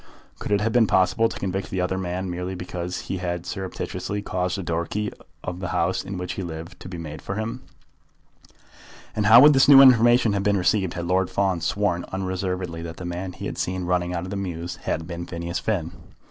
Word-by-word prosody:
Could - - -5
it 100 0 +3
have 115 +2 +1
been 120 -3 +5
possible 100 +5 +3
to - - -7
convict 95 0 -3
the 95 - -3
other 90 +1 0
man, 95 +1 -3
merely 90 +1 -4
because 90 0 -5
he 95 - -4
had 85 -1 -3
surreptitiously 95 +2 -4
caused 90 0 -1
a 95 - -4
door 85 0 -2
key 105 0 -2 0.3
of 90 0 -4
the 90 - -3
house 85 +2 0
in 95 - -6
which 90 0 -4
he - - -5
lived 85 +1 -7
to 90 - -9
be 90 - -6
made 80 -2 -7
for 100 - -5
him? 115 +4 -4 1.5
And 105 -1 +1
how 115 +2 +10
would 150 +2 +8
this 135 -1 +5
new 140 -2 +10
information 120 -4 +6
have 100 - 0
been 100 0 +2
received 95 0 +1
had 85 -1 -3
Lord 90 +1 +1
Fawn 95 -4 0
sworn 85 0 0
unreservedly 95 -2 -3
that 85 0 -7
the 90 - -7
man 90 +1 -4
he - - -7
had - - -5
seen 90 0 -2
running 90 0 0
out 85 -1 -2
of 90 - -6
the - - -3
mews 90 -3 -4
had 80 - -3
been 85 +1 -6
Phineas 85 +1 -4
Finn? 90 -7 -2
90 Hz, 220 wpm, -24 LUFS, 85-100 Hz, 1.5 s, how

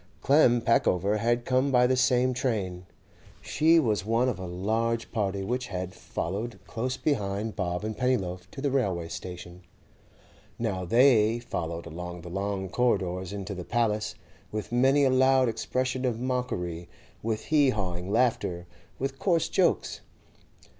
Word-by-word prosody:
Clem 125 -4 +5
Peckover 105 -3 +2
had 120 +2 0
come 130 +2 +2
by 125 -1 +5
the 130 +1 +3
same 130 0 +3
train; 100 -8 -2 0.5
she 165 +2 +3
was 110 - +1
one 115 +4 +2
of 125 - -3
a 95 - -5
large 110 +6 -1
party 100 -3 -1
which 125 +5 -2
had 90 -1 -4
followed 100 +7 -4
close 125 +3 -3
behind 105 -6 -1
Bob 90 -1 -2
and 110 0 -3
Pennyloaf 95 -8 -1
to 135 - -8
the 140 -1 0
railway 95 -11 0
station. 90 0 -8 1.0
Now 100 -6 -2
they 115 +1 +4
followed 85 -8 -4
along 90 +1 -7
the 85 - -9
long 95 0 -2
corridors 95 -5 0
into 100 0 -5
the 90 -2 -6
'Paliss,' 110 -1 0 0.4
with 105 +1 -4
many 135 +4 +4
a 135 - +4
loud 130 0 +4
expression 130 +3 -2
of 120 -3 -1
mockery, 90 -10 -3 0.3
with 110 -1 -2
hee 145 -3 +5
hawing 95 -4 -3
laughter, 110 -7 +1 0.3
with 135 0 -4
coarse 170 -4 +1
jokes. - - +1
110 Hz, 145 wpm, -27 LUFS, 95-125 Hz, 1.0 s, Clem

